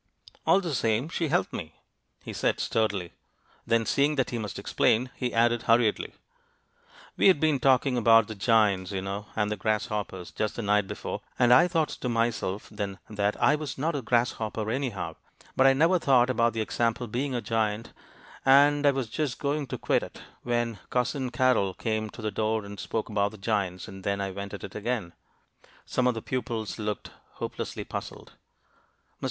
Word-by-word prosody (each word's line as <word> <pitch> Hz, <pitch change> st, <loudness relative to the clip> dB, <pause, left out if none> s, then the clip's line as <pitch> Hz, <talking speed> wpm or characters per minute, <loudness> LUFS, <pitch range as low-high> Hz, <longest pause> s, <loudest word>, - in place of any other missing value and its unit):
"All 195 Hz, -, +5 dB
the 170 Hz, -5 st, -3 dB
same, 115 Hz, +2 st, +1 dB
she 170 Hz, -1 st, -1 dB
helped 175 Hz, +5 st, 0 dB
me," 80 Hz, -1 st, -6 dB, 0.5 s
he -, -, -7 dB
said, -, -, 0 dB
sturdily. 100 Hz, -6 st, -1 dB, 0.5 s
Then, 115 Hz, -1 st, +2 dB
seeing 145 Hz, +5 st, +2 dB
that 135 Hz, -3 st, 0 dB
he 120 Hz, -, -2 dB
must 105 Hz, -3 st, -5 dB
explain, 125 Hz, +3 st, +1 dB
he 125 Hz, -2 st, -2 dB
added, 120 Hz, 0 st, +3 dB
hurriedly 115 Hz, -2 st, +2 dB, 1.0 s
"We -, -, +5 dB
had 185 Hz, -6 st, +6 dB
been 155 Hz, -3 st, +2 dB
talking 130 Hz, 0 st, +3 dB
about 115 Hz, -2 st, +5 dB
the 110 Hz, -, -5 dB
giants, 105 Hz, -3 st, +2 dB
you 95 Hz, -1 st, -3 dB
know, 100 Hz, +2 st, -5 dB
and 105 Hz, -1 st, 0 dB
the 105 Hz, -, -2 dB
grasshoppers, 105 Hz, -3 st, -2 dB
just 110 Hz, -1 st, -2 dB
the 115 Hz, -, -4 dB
night 105 Hz, -1 st, +2 dB
before, -, -, -5 dB, 0.2 s
and 125 Hz, -1 st, +5 dB
I 130 Hz, +8 st, +7 dB
thought 165 Hz, -3 st, +1 dB
to 125 Hz, -, -4 dB
myself 115 Hz, -4 st, -1 dB
then 100 Hz, -2 st, -4 dB
that 105 Hz, 0 st, -1 dB
I -, -, +5 dB
was 150 Hz, -2 st, -3 dB
not 160 Hz, +5 st, 0 dB
a 140 Hz, -, -2 dB
grasshopper, 110 Hz, -2 st, 0 dB
anyhow; 115 Hz, -, -3 dB, 0.4 s
but 130 Hz, -, +5 dB
I 135 Hz, -, +6 dB
never 165 Hz, +6 st, +3 dB
thought 130 Hz, -4 st, +4 dB
about 115 Hz, -2 st, +2 dB
the 110 Hz, -, -1 dB
example 115 Hz, +2 st, 0 dB
being 125 Hz, +4 st, -2 dB
a -, -, 0 dB
giant, 110 Hz, 0 st, -1 dB, 0.5 s
and 145 Hz, +2 st, +5 dB
I -, -, +8 dB
was 135 Hz, -3 st, -1 dB
just 130 Hz, +2 st, -2 dB
going 145 Hz, 0 st, -1 dB
to -, -, -4 dB
quit -, -, +1 dB
it -, -, -9 dB, 0.2 s
when 120 Hz, -3 st, -1 dB
Cousin 125 Hz, +1 st, 0 dB
Carrol 125 Hz, -7 st, +2 dB
came 110 Hz, -1 st, -2 dB
to 110 Hz, -, -10 dB
the 110 Hz, -, -1 dB
door 110 Hz, 0 st, -1 dB
and 100 Hz, -1 st, -9 dB
spoke 110 Hz, -, -3 dB
about 100 Hz, -1 st, 0 dB
the -, -, -10 dB
giants, 95 Hz, -3 st, -2 dB
and 95 Hz, 0 st, -10 dB
then 100 Hz, 0 st, -1 dB
I 100 Hz, -1 st, -2 dB
went 100 Hz, +1 st, -6 dB
at 100 Hz, -, -10 dB
it -, -, -7 dB
again." 105 Hz, -5 st, -3 dB, 0.7 s
Some 125 Hz, -1 st, +1 dB
of 125 Hz, -, +2 dB
the 115 Hz, -, -5 dB
pupils 115 Hz, -4 st, -3 dB
looked 105 Hz, -1 st, -4 dB, 0.2 s
hopelessly -, -, -5 dB
puzzled. -, -, -7 dB
Mr. -, -, -25 dB
115 Hz, 190 wpm, -27 LUFS, 105-130 Hz, 1.0 s, I